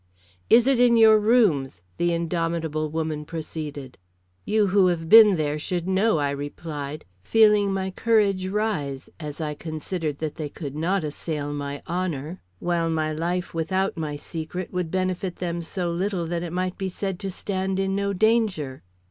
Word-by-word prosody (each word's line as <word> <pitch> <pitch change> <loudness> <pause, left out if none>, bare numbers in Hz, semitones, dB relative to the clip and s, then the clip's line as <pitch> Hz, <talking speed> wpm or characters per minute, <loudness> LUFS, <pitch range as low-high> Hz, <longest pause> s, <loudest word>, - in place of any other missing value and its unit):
"Is 230 +1 +7
it 265 -2 +3
in 240 -1 +5
your 220 -1 +7
rooms?" 185 - +2
the 175 0 +1
indomitable 165 -2 -1
woman 155 -1 -2
proceeded. 150 -4 -7 0.5
"You 215 0 +3
who 195 -2 +5
have 165 -2 -1
been 215 +1 +9
there 150 -2 -1
should 175 +3 -3
know," 190 +1 +2
I 145 -1 0
replied, 145 +1 -6 0.2
feeling 210 - +4
my 190 0 -2
courage 200 -3 +2
rise, 190 -10 -2
as 150 -1 -6
I 150 -2 -2
considered 155 0 -4
that 155 0 -4
they 155 -3 -4
could 140 -2 -7
not 175 +4 0
assail 150 -1 -4
my 145 0 -5
honor, 170 -2 -3 0.2
while 170 - 0
my 155 -1 0
life 175 +3 -2
without 190 +4 0
my 155 -3 -3
secret 165 +4 -6
would 180 -2 -1
benefit 185 0 -1
them 175 -1 -3
so 175 +1 -3
little 180 0 -1
that 170 +1 -2
it 170 -1 -5
might 185 +1 -2
be 190 -1 -2
said 190 0 -4
to 195 - -4
stand 190 0 -2
in 195 0 0
no 200 0 0
danger. 200 - +1
170 Hz, 165 wpm, -24 LUFS, 155-195 Hz, 0.5 s, been